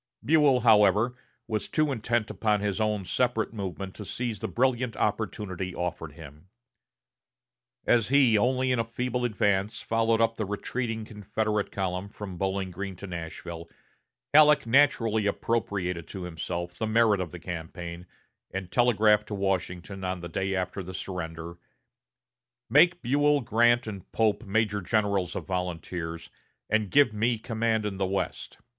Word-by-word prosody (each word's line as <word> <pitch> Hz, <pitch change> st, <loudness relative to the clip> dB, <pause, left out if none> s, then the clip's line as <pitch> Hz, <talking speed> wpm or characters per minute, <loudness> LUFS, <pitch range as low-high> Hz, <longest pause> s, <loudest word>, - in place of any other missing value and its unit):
Buell, 145 Hz, -4 st, +4 dB
however, 110 Hz, +1 st, +5 dB, 0.3 s
was 110 Hz, -3 st, -2 dB
too 155 Hz, -1 st, +1 dB
intent 115 Hz, -2 st, -1 dB
upon 105 Hz, -2 st, +1 dB
his 100 Hz, +1 st, -1 dB
own 105 Hz, -3 st, 0 dB
separate 120 Hz, +2 st, 0 dB
movement 95 Hz, -2 st, -5 dB
to 105 Hz, -, -6 dB
seize 115 Hz, 0 st, -4 dB
the -, -, -3 dB
brilliant 125 Hz, -2 st, 0 dB
opportunity 100 Hz, -4 st, -2 dB
offered 85 Hz, -3 st, -4 dB
him. 75 Hz, +3 st, -13 dB, 1.4 s
As 115 Hz, -3 st, +3 dB
he 135 Hz, -4 st, +5 dB
only 130 Hz, +4 st, +2 dB
in 125 Hz, -, +1 dB
a -, -, +2 dB
feeble 125 Hz, +2 st, -3 dB
advance 105 Hz, -2 st, 0 dB
followed 115 Hz, 0 st, +2 dB
up 115 Hz, 0 st, +2 dB
the 110 Hz, -, -1 dB
retreating 110 Hz, +2 st, -3 dB
Confederate 105 Hz, 0 st, -2 dB
column 95 Hz, 0 st, -3 dB
from 100 Hz, -3 st, -8 dB
Bowling 95 Hz, -1 st, -1 dB
Green 95 Hz, +2 st, -5 dB
to 95 Hz, -, -9 dB
Nashville, 85 Hz, -1 st, -7 dB, 0.6 s
Halleck 150 Hz, -2 st, +7 dB
naturally 115 Hz, -4 st, +3 dB
appropriated 95 Hz, -6 st, -1 dB
to 95 Hz, -3 st, -7 dB
himself 85 Hz, +1 st, -5 dB
the 110 Hz, -, 0 dB
merit 110 Hz, -3 st, +3 dB
of 90 Hz, -, -3 dB
the 90 Hz, -, -7 dB
campaign, 85 Hz, 0 st, -7 dB, 0.4 s
and 95 Hz, -2 st, -5 dB
telegraphed 110 Hz, -3 st, +4 dB
to 105 Hz, -, -4 dB
Washington 95 Hz, 0 st, -2 dB
on 95 Hz, 0 st, -2 dB
the 85 Hz, -1 st, -7 dB
day 95 Hz, +3 st, -1 dB
after 95 Hz, +1 st, -2 dB
the 95 Hz, 0 st, -8 dB
surrender: 85 Hz, -2 st, -6 dB, 1.1 s
"Make 175 Hz, +4 st, +5 dB
Buell, 145 Hz, +3 st, +3 dB
Grant, 120 Hz, +1 st, +3 dB
and 100 Hz, -4 st, -8 dB
Pope 110 Hz, +1 st, +1 dB
major 105 Hz, 0 st, +1 dB
generals 100 Hz, -3 st, 0 dB
of -, -, -4 dB
volunteers, 85 Hz, -2 st, -4 dB, 0.4 s
and 110 Hz, -2 st, +2 dB
give 140 Hz, -3 st, +4 dB
me 115 Hz, +3 st, +1 dB
command 110 Hz, 0 st, -1 dB
in 100 Hz, -2 st, -3 dB
the 95 Hz, -1 st, 0 dB
West. 95 Hz, +1 st, -3 dB
105 Hz, 150 wpm, -27 LUFS, 95-115 Hz, 1.4 s, Halleck